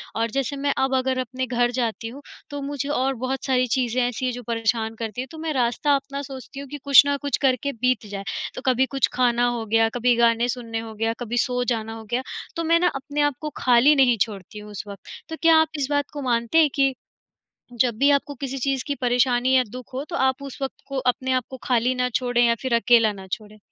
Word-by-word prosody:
और 230 +1 0
जैसे 275 +2 -1
मैं 280 0 0
अब 265 0 +1
अगर 260 0 0
अपने 255 +1 -3
घर 240 0 +1
जाती 235 -2 -2
हूँ, 260 +5 -9 0.3
तो 285 0 -5
मुझे 280 0 -4
और 270 -2 +1
बहुत 265 +1 -2
सारी 255 -2 +2
चीज़ें 250 0 0
ऐसी 245 +1 -3
हैं 255 - +1
जो 245 +1 -7
परेशान 225 -1 -1
करती 225 +1 -4
हैं, 260 - -6
तो 320 - -10
मैं 315 -1 -3
रास्ता 260 +3 +2
अपना 275 0 -4
सोचती 270 0 -9
हूँ 280 - -7
कि 290 - -6
कुछ 280 -2 +8
न 285 - +2
कुछ 285 -1 0
करके 265 0 +1
बीत 250 -3 +1
जाए। 200 -1 -5 0.3
तो - - -6
कभी 260 0 +3
कुछ 270 +1 +1
खाना 245 -1 +2
हो 240 -2 -2
गया, 225 +1 +3
कभी 245 0 +3
गाने 235 0 +3
सुनने 230 -2 -3
हो 225 -1 -7
गया, 225 +1 0
कभी 240 0 -3
सो 250 -2 -1
जाना 225 0 -4
हो 225 0 -9
गया, 245 - +1 0.3
तो 335 - -2
मैं 335 +1 +3
ना 355 - +3
अपने 285 +2 -3
आप 290 -2 +2
को 305 - -3
खाली 255 +4 +5
नहीं 255 -4 +4
छोड़ती 205 0 -3
हूँ 210 0 -11
उस 205 - -6
वक़्त। 200 -2 -10 0.2
तो 320 - -4
क्या 330 -1 +6
आप 320 - 0
इस 270 - 0
बात 285 -1 0
को 290 - -5
मानते 235 +1 0
हैं 310 -2 +5
कि 275 -1 +3 0.9
जब 245 -3 +3
भी 280 +1 +4
आपको 285 +1 +1
किसी 270 -1 -4
चीज़ 270 0 -1
की 285 - -1
परेशानी 245 +1 +2
या 255 - +5
दुख 255 +2 -10
हो 270 +2 -3
तो 345 - -2
आप 265 -1 +1
उस 275 -2 -8
वक़्त 270 - -5
को 275 -1 -3
अपने 260 +1 -3
आप 255 -1 +1
को 260 - -7
खाली 250 0 +2
ना 250 0 0
छोड़ें 245 -1 +2
या 235 - +3
फिर 260 -3 0
अकेला 230 -2 +4
ना 195 -1 -10
छोड़ें। 215 -1 -6
255 Hz, 245 wpm, -23 LUFS, 235-275 Hz, 0.9 s, कुछ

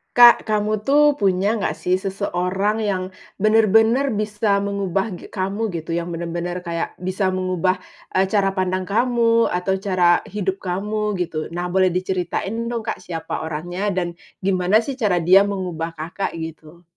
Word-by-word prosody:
Kak, 240 -1 +8
kamu 215 0 -1
tuh 295 +3 +4
punya 195 -1 +1
nggak 215 - -1
sih 180 - 0
seseorang 195 +2 -1
yang 195 -3 0 0.4
benar-benar 225 +5 +4
bisa 210 -1 0
mengubah 200 -1 -1
ge - - -12
kamu, 200 +3 -2
gitu, 165 -1 -4
yang 170 0 -3
benar-benar 170 +1 -3
kayak 170 0 -3
bisa 185 +1 -1
mengubah, 185 0 0 0.3
eee, 190 0 +2
cara 195 -1 +2
pandang 185 -1 -1
kamu, 230 +2 +2
atau 180 +2 -1
cara 185 -3 +3
hidup 195 -1 -2
kamu, 210 +3 -2
gitu? 165 -4 -3
Nah, 175 0 -3
boleh 185 0 +4
diceritain 185 +5 -2
dong, 235 -1 -3
Kak, 220 - -4
siapa 170 -3 -5
orangnya 175 +5 -4
dan 175 -2 -1 0.3
gimana 190 +3 +3
sih 270 +2 -5
cara 210 -6 +2
dia 195 +4 +6
mengubah 175 -4 -4
Kakak? 170 +5 -4
Gitu. 160 +1 -9
190 Hz, 150 wpm, -21 LUFS, 180-210 Hz, 0.4 s, Kak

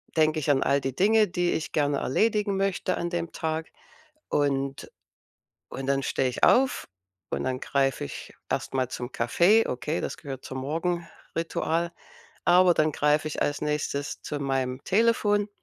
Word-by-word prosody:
denke 155 0 +3
ich 145 - -2
an 135 -2 +3
all 140 0 +2
die 135 -1 -3
Dinge, 215 +2 +4
die 175 0 0
ich 160 - -3
gerne 145 -2 +1
erledigen 210 - +1
möchte 195 -1 0
an 175 - -2
dem 170 -1 -3
Tag. 160 0 -3 0.6
Und 140 -1 -1 0.8
und 135 - -6
dann 140 0 +2
stehe 130 0 0
ich 125 - -7
auf, 260 0 +4 0.4
und - - -2
dann 130 0 -2
greife 135 - 0
ich - - -8 0.2
erst - - -2
mal 130 -2 +1
zum 125 0 -6
Kaffee, 175 - +3
okay, 150 +6 -2
das - - -3
gehört 135 -3 -8
zum 130 0 -5
Morgenritual. 165 +1 -2 0.5
Aber 180 0 +6
dann 155 -1 +2
greife 150 +1 +2
ich - - -5
als 145 - 0
Nächstes 150 -1 -2
zu 145 - -4
meinem 135 -1 -1
Telefon. 205 -1 +2
155 Hz, 160 wpm, -26 LUFS, 135-175 Hz, 0.8 s, Aber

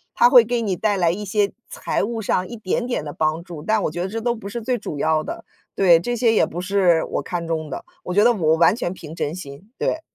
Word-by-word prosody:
他 240 - +6
会 245 -2 +8
给 240 +1 -1
你 200 -5 -1
带 210 +1 +1
来 170 -3 +3
一 205 +4 -5
些 205 0 +1 0.2
财 - - -2
务 225 +2 -3
上 185 -2 0
一 240 - -8
点 220 +2 -2
点 240 - -2
的 145 - -6
帮 155 +1 -1
助， 170 -4 -9
但 215 +3 +1
我 - - -1
觉 175 +2 -4
得 180 - -1
这 225 +3 -4
都 240 +1 +1
不 220 -4 -8
是 235 +3 -5
最 250 +2 -1
主 180 -9 -6
要 155 +1 +1
的。 - - -6 0.3
对， 175 -4 +5
这 245 +8 -2
些 235 -1 +3
也 - - +4
不 175 +2 -6
是 185 -3 +2
我 - - -3
看 170 -2 -4
中 160 -1 -2
的， - - -6 0.2
我 180 - -4
觉 205 +3 +4
得 240 - +6
我 160 -7 +2
完 170 +4 +5
全 185 -7 -3
凭 160 -4 -10
真 150 -2 -2
心， 180 +5 -10
对。 315 - -1
190 Hz, 290 characters per minute, -22 LUFS, 165-225 Hz, 0.3 s, 会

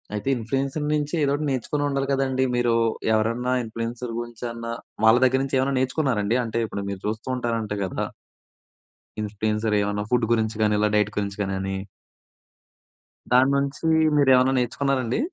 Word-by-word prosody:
అయితే 105 +3 -5
ఇన్‌ఫ్లూయెన్సర్ 135 +6 -2
నుంచి 150 0 -1
ఏదో 140 - +2
ఒకటి 150 +2 -1
నేర్చుకొని 135 +3 -1
ఉండాలి 135 -1 -1
కదండీ. 135 -1 +1
మీరు 120 -1 +2 0.4
ఎవరన్నా 115 +3 0
ఇన్‌ఫ్లూయెన్సర్ 115 +2 -5
గురించి 120 0 -8
అన్న, 115 0 -7 0.4
వాళ్ళ 110 +2 +7
దగ్గర 130 +1 +4
నుంచేమన్నా 135 0 0
నేర్చుకున్నారండి 125 -5 +1
అంటే 115 0 -2
ఇప్పుడు 100 - -5
మీరు 100 -1 -5
చూస్తూ 110 +3 -3
ఉంటారంట 115 -4 -2
కదా... 95 - -3 1.2
ఇన్‌ఫ్లూయెన్సర్ 105 +1 -1
ఏమన్నా 105 0 -1
ఫుడ్ 125 -2 +3
గురించి 110 -1 0
కానీ 105 0 +3
ఇలా 105 0 +3
డైట్ 105 0 +1
గురించి 100 -1 -2
గానని... 95 0 -3 1.6
దాని 130 +2 +5
నుంచి 140 +2 -2 0.3
మీరేమన్నా 130 -2 +5
నేర్చుకున్నారండి. 130 - 0
120 Hz, 140 wpm, -24 LUFS, 110-135 Hz, 1.6 s, వాళ్ళ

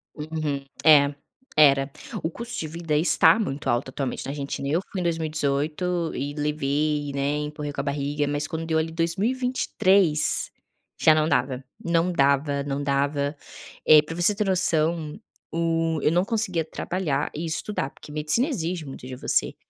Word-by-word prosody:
Uhum. 150 -2 -3 0.2
É, 145 -2 +6 0.4
era. 140 -2 +5 0.3
O 160 - 0
custo 235 +7 -6
de 160 - -3
vida 165 -1 -3
está 180 +7 +5
muito 145 -9 -2
alto 120 +3 0
atualmente 135 -1 -4
na 135 - -4
Argentina. 140 -1 -4
Eu 160 +5 +1
fui 195 - -3
em - - -2
2018 160 +1 -1
e 140 +2 -3
levei, 150 0 -1
né, 140 +1 0
empurrei 150 0 -4
com 140 - -3
a - - -7
barriga, 145 +1 -1
mas 145 0 -1
quando 160 +1 -4
deu 160 -1 0
ali 160 +1 -1
2023 190 -2 +1 0.5
já 155 -1 +6
não 155 0 +2
dava, 130 -2 0 0.2
não 170 +1 +1
dava, 140 -2 +2
não 140 0 -3
dava, 140 +1 0 0.5
eh, 150 -1 +8
pra 165 +2 -7
você 175 +4 +3
ter 210 - 0
noção 165 -3 0 0.3
o 165 -1 0
eu - - +3
não 175 +2 +3
conseguia 210 -7 0
trabalhar 160 -3 -2
e 155 - -4
estudar, 160 -2 -3
porque 150 - -14
medicina 155 - +1
exige 175 - -3
muito 135 -2 -9
de 130 - -6
você. 125 - 0
155 Hz, 165 wpm, -25 LUFS, 140-170 Hz, 0.5 s, eh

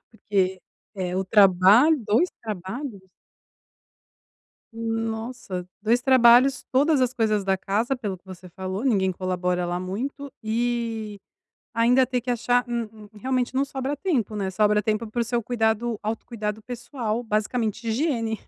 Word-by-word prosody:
porque, 190 -4 -1 0.3
eh, 185 -2 -3
o 190 - 0
trabalho 200 - +6
2 225 - +3
trabalhos. 215 +3 -5 1.7
Nossa, 225 -4 -4
2 230 +4 +2
trabalhos, 255 0 +6
todas 285 +2 +3
as 255 -1 +1
coisas 215 -3 +1
da 195 0 +1
casa, 215 +7 -1
pelo 205 -7 -4
que 175 - -44
você 185 -1 -11
falou, 190 +5 -5
ninguém 195 -8 +2
colabora 180 -1 -1
lá 175 0 -2
muito, 265 +10 -5
e 225 -2 -2 0.5
ainda 240 +3 +4
ter 250 0 -1
que 250 +1 -4
achar 245 +1 +2
um 235 -2 -2
um 215 -1 -14
realmente 255 +1 -1
não 270 +1 +2
sobra 275 +1 -3
tempo, 275 - -1
né, 195 -2 -2
sobra 210 +2 +2
tempo 215 +2 -1
para 235 +3 -3
o - - +1
seu 240 +1 -1
cuidado 225 0 0
autocuidado 215 -1 -4
pessoal, 240 -1 -4
basicamente 220 0 -1
higiene 230 -3 -1
225 Hz, 145 wpm, -24 LUFS, 200-245 Hz, 1.7 s, trabalho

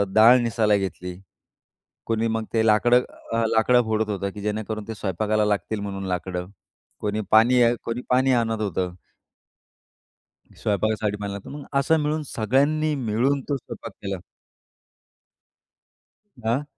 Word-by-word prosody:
डाळ 115 +4 +8
निसायला 110 -3 +2
घेतली. 90 -2 -4 0.9
कोणी 115 0 0
मग 110 0 -1
ते 110 0 +3
लाकडं 120 +3 +5 0.3
अ, 115 0 +1
लाकडं 120 +2 +4
फोडत 110 0 0
होतं, 100 -1 -2
की 105 - -9
जेणेकरून 110 0 -3
ते 110 - -4
स्वयंपाकाला 105 +2 0
लागतील 105 +1 -1
म्हणून 95 -1 -5
लाकडं, 90 0 -3 0.5
कोणी 105 +1 -1
पाणी 120 +3 +6 0.2
कोणी 120 +2 -3
पाणी 130 +1 +4
आणत 110 -1 -2
होतं. 90 -2 -2 1.7
स्वयंपाकासाठी 105 0 0
पाणी 100 -1 -4
लागतं 100 -1 -8
म्हणून 145 -1 -8
असं 160 +4 +3
मिळून 155 +1 -1
सगळ्यांनी 145 +7 +2
मिळून 125 +6 +1
तो 140 - +1
स्वयंपाक 115 -3 -9
केला. 100 -1 -3 2.2
दा 115 +5 0
110 Hz, 130 wpm, -24 LUFS, 105-120 Hz, 2.2 s, डाळ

